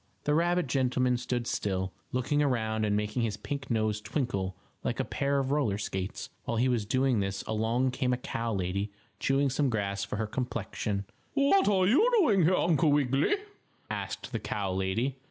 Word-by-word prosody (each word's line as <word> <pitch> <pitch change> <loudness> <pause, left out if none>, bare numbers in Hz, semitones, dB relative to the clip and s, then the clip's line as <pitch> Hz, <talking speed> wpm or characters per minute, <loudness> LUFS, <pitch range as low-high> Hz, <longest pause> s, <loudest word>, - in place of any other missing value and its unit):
The 150 - +1
rabbit 175 +2 +2
gentleman 125 -1 +1
stood 120 -1 -2
still, 95 -4 -1 0.2
looking 130 +4 +1
around 110 -6 +1
and 105 -1 +1
making 105 +3 -1
his 110 -3 -1
pink 135 +5 -5
nose 110 -2 0
twinkle 100 -8 -2 0.3
like - - -2
a - - +1
pair 140 0 0
of 135 -1 0
roller 135 -9 +1
skates. 95 -2 -4
While 115 - -1
he 125 +3 +3
was 120 -5 0
doing 130 -1 +2
this 95 0 -2
along 115 +4 +1
came 125 0 0
a 125 - +1
cow 115 -2 -3
lady 100 +1 -1 0.3
chewing 135 0 +2
some 140 +1 +1
grass 100 -3 -1
for - - -4
her 110 +1 -1
complexion. 105 -4 -3 0.3
"What 285 +8 +4
are 190 -3 +4
you 295 - +5
doing 205 - +4
here, 185 +3 +4
Uncle 160 -3 +3
Wiggily?" 140 - +3 0.6
asked - - -4
the - - -2
cow 100 -3 -2
lady. 110 +8 -1
125 Hz, 180 wpm, -29 LUFS, 105-140 Hz, 0.6 s, you